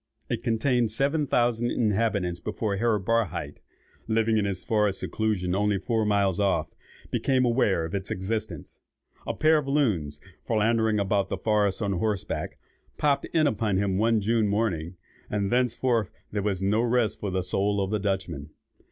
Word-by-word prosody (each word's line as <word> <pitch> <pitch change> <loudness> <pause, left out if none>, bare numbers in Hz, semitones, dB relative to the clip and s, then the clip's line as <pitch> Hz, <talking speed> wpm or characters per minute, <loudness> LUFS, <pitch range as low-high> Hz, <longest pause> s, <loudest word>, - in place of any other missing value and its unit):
It 115 - -1
contained 120 0 +1
seven 140 +6 +1
thousand 120 -1 +1
inhabitants 105 -6 0
before 105 -3 -2
Herr 115 0 +2
Barhydt, 115 -1 -1 0.5
living 110 0 +2
in 100 - 0
his 95 -2 -2
forest 105 -4 +1
seclusion 105 -5 -1
only 105 +1 +1
four 110 +3 0
miles 100 -3 +2
off, 100 -2 0 0.4
became 130 -2 +2
aware 110 -8 +2
of 80 - -7
its 100 0 -3
existence. 95 -3 -4 0.5
A - - -2
pair 155 0 +4
of 140 - -6
loons, 100 - 0 0.2
philandering 110 -1 +2
about 100 0 +1
the - - -2
forest 105 -2 +1
on 100 -1 0
horseback, 100 +1 -2 0.4
popped 145 -2 +1
in 160 -2 +1
upon 105 -7 +1
him 95 -1 0
one 115 0 +3
June 110 +1 +2
morning, 100 -5 -1 0.3
and 100 -1 -1
thenceforth 120 -3 +1 0.2
there 105 - -1
was 95 -2 -1
no 105 +3 +2
rest 120 -2 +1
for 100 - -3
the 95 0 -1
soul 100 +3 0
of 95 0 -1
the 105 - 0
Dutchman. 95 -8 -3
105 Hz, 160 wpm, -26 LUFS, 95-115 Hz, 0.5 s, pair